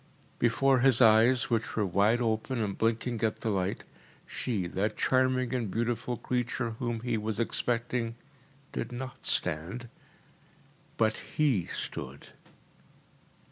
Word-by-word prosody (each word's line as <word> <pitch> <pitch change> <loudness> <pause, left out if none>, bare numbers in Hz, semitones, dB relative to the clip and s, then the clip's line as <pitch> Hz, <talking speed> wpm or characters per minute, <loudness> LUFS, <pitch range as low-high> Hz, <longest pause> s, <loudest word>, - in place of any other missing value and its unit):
Before 130 +3 +3
his 130 -1 +4
eyes, 115 +1 +5
which 115 -1 0
were 105 - +1
wide 105 +6 +2
open 115 +3 -1
and 100 -3 -1
blinking 115 +1 0
at 110 -1 0
the 110 - 0
light, 95 -1 -1 0.4
she, 105 -8 -2
that 100 +5 -2
charming 130 -1 +2
and 120 -5 -1
beautiful 115 +3 -1
creature 125 -1 -2
whom 120 -2 -2
he 120 -2 -1
was 110 0 -3
expecting, 115 0 -1 0.6
did - - -4
not 130 +1 -6
stand, 90 +11 0 1.1
but 110 -1 +2 0.2
HE 135 - +2
stood. 65 +2 -6
115 Hz, 125 wpm, -29 LUFS, 110-125 Hz, 1.1 s, eyes